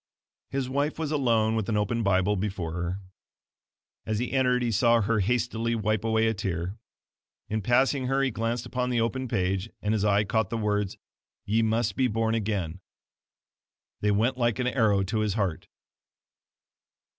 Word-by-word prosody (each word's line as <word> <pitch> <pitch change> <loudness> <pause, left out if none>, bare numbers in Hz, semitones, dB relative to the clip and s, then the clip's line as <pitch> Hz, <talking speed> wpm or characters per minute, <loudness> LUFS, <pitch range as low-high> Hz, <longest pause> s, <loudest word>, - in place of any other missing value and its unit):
His 135 -1 -2
wife 140 +3 -1
was 160 -2 -2
alone 115 -6 +2
with 110 -2 -1
an 105 - +1
open 105 +3 0
Bible 100 0 +2
before 95 -4 -3
her. 85 +3 -3 1.0
As 110 - -2
he 125 +3 -2
entered 125 -2 +2
he 120 - 0
saw 115 +2 +4
her 110 +1 +1
hastily 115 +2 0
wipe 110 -1 0
away 110 0 +2
a 110 - +2
tear. 95 -1 -3 0.7
In 110 0 -1
passing 130 +4 +2
her 135 +1 +1
he 135 - +1
glanced 115 +1 -2
upon 125 0 -2
the 120 -1 +1
open 130 +3 -1
page, 95 0 -1
and 105 +1 -1
his 105 -2 0
eye 105 0 +3
caught 110 -1 0
the 115 - -2
words 105 -2 -1 0.5
"YE 110 +3 +2
MUST 110 -2 +1
BE 130 - +2
BORN 115 0 0
AGAIN!" 100 -6 -2 1.2
They 105 - +1
went 115 +6 +1
like 120 -2 +1
an 125 - -1
arrow 110 -5 +2
to 110 +4 -1
his 105 -2 0
heart. 95 -7 -2
110 Hz, 170 wpm, -27 LUFS, 100-120 Hz, 1.2 s, saw